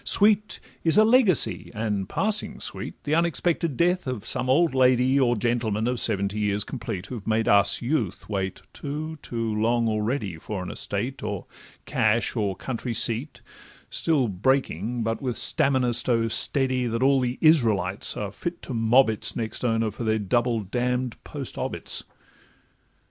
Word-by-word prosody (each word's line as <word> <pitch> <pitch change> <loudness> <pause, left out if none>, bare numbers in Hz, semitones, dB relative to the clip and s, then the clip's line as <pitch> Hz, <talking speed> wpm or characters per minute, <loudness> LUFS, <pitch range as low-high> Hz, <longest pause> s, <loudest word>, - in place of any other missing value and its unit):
Sweet 210 0 +4 0.2
is 165 +3 +4
a 215 - +7
legacy, 225 - +3
and 105 -3 -2
passing 215 +1 -1
sweet - - -4
The 145 - -2
unexpected 170 -3 0
death 180 -2 +1
of 120 -5 -4
some 125 0 0
old 160 +3 +3
lady 130 +1 +3
Or 120 -2 +3
gentleman 115 -1 -1
of 125 -1 -1
seventy 100 +1 0
years 105 -1 0
complete, 95 -3 -5
Who've 115 -5 -8
made 110 0 +1
'us 100 +2 +3
youth' 120 - -2
wait 95 -2 -3
too—too 145 -6 -4
long 115 +2 +1
already 105 - -2
For 95 +2 -5
an 90 - -6
estate, 120 +7 -4
or 105 -3 -4 0.4
cash, 110 +3 +1
or 100 -4 -1
country 120 +3 -4
seat, 120 +7 -1 0.5
Still 145 -7 +1
breaking, 115 - -1
but 115 +3 -2
with 125 -4 -2
stamina 130 -3 +3
so 115 -1 +2
steady 130 0 +2
That 115 +2 -1
all 135 0 +4
the 125 0 -2
Israelites 110 - +2
are 105 -1 -4
fit 170 - -6
to 130 - -6
mob 115 +3 +4
its 110 -1 -2
Next 115 +1 -4
owner 115 -2 +1
for 120 - -7
their 110 -1 +1
double 115 +2 0
damn'd 125 +4 -2
post - - -7
obits. - - -4
120 Hz, 155 wpm, -25 LUFS, 110-135 Hz, 0.5 s, a